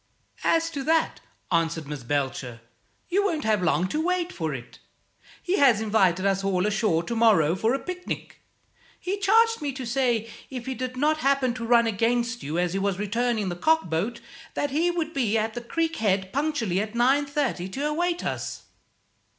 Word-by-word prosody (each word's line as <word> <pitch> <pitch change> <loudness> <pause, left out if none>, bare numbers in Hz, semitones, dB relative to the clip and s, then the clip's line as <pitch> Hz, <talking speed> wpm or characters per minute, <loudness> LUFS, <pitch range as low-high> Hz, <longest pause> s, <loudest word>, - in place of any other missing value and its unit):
"As 330 0 +2
to 285 -4 -4
that," 320 +1 +1 0.3
answered 165 -2 0
Miss 145 -2 -5
Belcher, 130 -2 -2 0.5
"you 390 +3 +1
won't 330 -7 0
have 215 -3 +2
long 175 +1 +2
to 310 +9 -1
wait 360 0 0
for 160 -3 -3
it. 120 -4 -8 0.6
He 365 +2 0
has 260 -7 +5
invited 195 -4 +2
us 195 0 +1
all 190 -1 +1
ashore 210 -6 +1
to 235 - -4
morrow, 210 -9 +4
for 225 +6 +1
a - - +1
picnic. 360 +4 -6 0.6
He 390 +3 -3
charged 455 +2 +4
me 290 -1 -1
to 260 -1 -6
say 235 -2 +1 0.2
if 250 -3 -6
he 265 - -2
did 255 0 -5
not 305 +3 +2
happen 275 -4 +2
to 235 -1 -5
run 235 0 +5
against 235 +3 0
you 155 +4 -3
as 175 0 0
he 195 - 0
was 195 -1 0
returning 220 0 0
the 175 - -3
cockboat 220 - 0 0.3
that 290 - -1
he 325 +5 +2
would 330 -2 -2
be 225 -5 +1
at 220 0 -1
the 240 - -5
creek 325 +7 -2
head 190 -3 0
punctually 260 - 0
at 215 +2 -5
nine 270 +4 +3
thirty 275 -11 -1
to 270 +10 -3
await 345 +3 -1
us." - - -4
235 Hz, 185 wpm, -25 LUFS, 190-295 Hz, 0.6 s, has